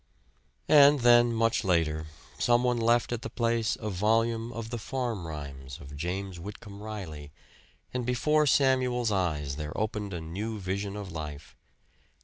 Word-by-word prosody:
And 145 Hz, -2 st, +7 dB
then, 120 Hz, 0 st, +6 dB
much 115 Hz, 0 st, +1 dB
later, 80 Hz, -4 st, +1 dB, 0.3 s
some 120 Hz, 0 st, +3 dB
one 125 Hz, -1 st, +1 dB
left 120 Hz, +1 st, +2 dB
at 120 Hz, -1 st, -2 dB
the -, -, -5 dB
place 115 Hz, -2 st, 0 dB
a 110 Hz, -2 st, -3 dB
volume 115 Hz, +4 st, +1 dB
of 115 Hz, -1 st, -6 dB
the 120 Hz, -, -3 dB
"Farm 115 Hz, -7 st, -3 dB
Rhymes" 70 Hz, -2 st, -7 dB
of 70 Hz, -2 st, -10 dB
James 90 Hz, +3 st, -4 dB
Whitcomb 100 Hz, +2 st, -9 dB
Riley; 85 Hz, -9 st, -7 dB, 0.6 s
and 125 Hz, -1 st, -1 dB
before 150 Hz, +5 st, +2 dB
Samuel's 130 Hz, -4 st, +3 dB
eyes 75 Hz, -7 st, -1 dB
there 75 Hz, 0 st, -5 dB
opened 105 Hz, -2 st, -2 dB
a -, -, -3 dB
new 100 Hz, +8 st, -4 dB
vision 100 Hz, +1 st, -3 dB
of 100 Hz, -3 st, -6 dB
life. 75 Hz, -3 st, -7 dB
105 Hz, 150 wpm, -29 LUFS, 85-120 Hz, 0.6 s, And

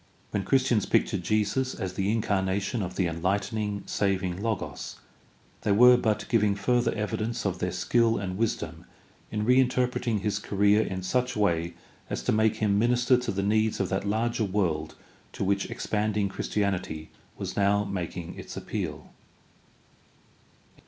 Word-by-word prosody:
When 100 Hz, -, -1 dB
Christians 130 Hz, -5 st, +2 dB
pictured -, -, +1 dB
Jesus 110 Hz, +5 st, 0 dB
as 95 Hz, -1 st, -4 dB
the 95 Hz, +2 st, 0 dB
incarnation 100 Hz, 0 st, 0 dB
of 90 Hz, -1 st, -4 dB
the 95 Hz, -, +1 dB
enlightening, 100 Hz, +4 st, -1 dB
saving 95 Hz, -2 st, -1 dB
Logos 110 Hz, -3 st, -3 dB, 0.7 s
they 105 Hz, -, 0 dB
were 125 Hz, +4 st, +8 dB
but 110 Hz, -3 st, 0 dB
giving 105 Hz, -4 st, +2 dB
further 120 Hz, +3 st, +1 dB
evi 105 Hz, -1 st, -2 dB
dence 115 Hz, +2 st, -3 dB
of 95 Hz, -3 st, -1 dB
their 90 Hz, -, -1 dB
skill 115 Hz, +5 st, +2 dB
and 95 Hz, -2 st, -3 dB
wisdom 115 Hz, +3 st, -2 dB, 0.4 s
in 105 Hz, 0 st, -2 dB
reinterpreting 125 Hz, -3 st, +2 dB
his 105 Hz, 0 st, -1 dB
career 100 Hz, +1 st, +3 dB
in 95 Hz, -3 st, -3 dB
such 125 Hz, +7 st, 0 dB
way 85 Hz, -4 st, +1 dB, 0.3 s
as -, -, -3 dB
to -, -, +1 dB
make 110 Hz, 0 st, +3 dB
him 105 Hz, -2 st, +1 dB
minister 120 Hz, +2 st, +3 dB
to 125 Hz, -1 st, -2 dB
the 100 Hz, 0 st, -2 dB
needs 110 Hz, +2 st, +1 dB
of 95 Hz, -3 st, 0 dB
that 95 Hz, +1 st, -1 dB
larger 115 Hz, +2 st, 0 dB
world 90 Hz, -6 st, -1 dB, 0.4 s
to -, -, -3 dB
which 100 Hz, +1 st, 0 dB
expanding 105 Hz, -1 st, -1 dB
Christianity 95 Hz, -6 st, -2 dB, 0.3 s
was -, -, -5 dB
now 100 Hz, 0 st, +3 dB
making 90 Hz, -3 st, -4 dB
its -, -, -8 dB
appeal. -, -, -5 dB
105 Hz, 150 wpm, -27 LUFS, 95-115 Hz, 0.7 s, were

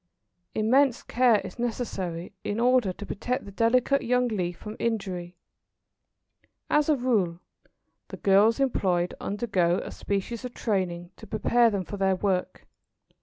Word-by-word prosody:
Immense 250 Hz, +4 st, +3 dB
care 240 Hz, -3 st, +3 dB
is -, -, -9 dB
necessary 195 Hz, -8 st, -3 dB
in 205 Hz, +2 st, -2 dB
order 245 Hz, -4 st, +3 dB
to 205 Hz, -, -8 dB
protect 250 Hz, +6 st, -3 dB
the 200 Hz, -, -9 dB
delicate 250 Hz, +6 st, +2 dB
young 250 Hz, +1 st, +2 dB
leaf 180 Hz, -5 st, -2 dB
from 215 Hz, 0 st, -8 dB
injury. 185 Hz, -6 st, -3 dB, 1.3 s
As 300 Hz, 0 st, +3 dB
a 305 Hz, -, +5 dB
rule, 215 Hz, -10 st, 0 dB, 0.7 s
the -, -, -8 dB
girls 205 Hz, +4 st, +4 dB
employed 185 Hz, -10 st, +1 dB
undergo 195 Hz, -5 st, 0 dB
a -, -, -7 dB
species 205 Hz, +4 st, -3 dB
of 250 Hz, -1 st, -7 dB
training 180 Hz, -5 st, -2 dB
to -, -, -12 dB
prepare 235 Hz, +2 st, +3 dB
them 200 Hz, -4 st, -2 dB
for 205 Hz, -, -6 dB
their 190 Hz, -1 st, +2 dB
work. 185 Hz, -1 st, -2 dB
210 Hz, 140 wpm, -27 LUFS, 185-240 Hz, 1.3 s, a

